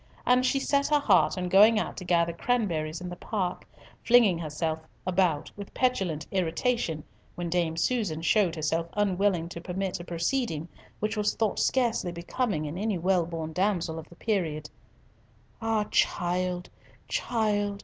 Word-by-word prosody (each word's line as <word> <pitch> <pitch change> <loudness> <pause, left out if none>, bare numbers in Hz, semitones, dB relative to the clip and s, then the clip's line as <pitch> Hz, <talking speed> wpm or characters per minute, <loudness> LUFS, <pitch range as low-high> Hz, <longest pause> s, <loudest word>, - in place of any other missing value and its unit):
And 250 0 +4
she 265 +2 +2
set 280 +1 +1
her 295 0 +3
heart 285 - +3
on 180 0 -2
going 210 +5 +6
out - - -2
to 185 - -5
gather 170 -1 +2
cranberries 170 -8 -1
in 180 - -5
the 175 - -6
park, 185 -2 -3 0.4
flinging 230 -8 +5
herself 160 0 -2 0.3
about 180 -5 +1
with 200 -1 -9
petulant 190 - 0
irritation 175 -2 0 0.3
when 175 -1 -4
Dame 165 -2 0
Susan 170 -5 0
showed 185 -2 +3
herself 165 +1 -1
unwilling 195 -4 +1
to 170 - -7
permit 185 +2 -3
a - - -6
proceeding 170 - -1 0.3
which 215 +1 -1
was 210 -1 0
thought 220 -3 0
scarcely 235 -8 +1
becoming 170 0 -2
in 155 +5 -5
any 210 -2 0
well 180 -1 +2
born 160 -2 -5
damsel 180 -3 0
of 160 - -11
the 175 - -15
period. 165 -8 -2 0.9
"Ah, 225 -1 +1
child, 180 0 0 0.4
child! 205 -3 0
180 Hz, 155 wpm, -28 LUFS, 165-215 Hz, 0.9 s, going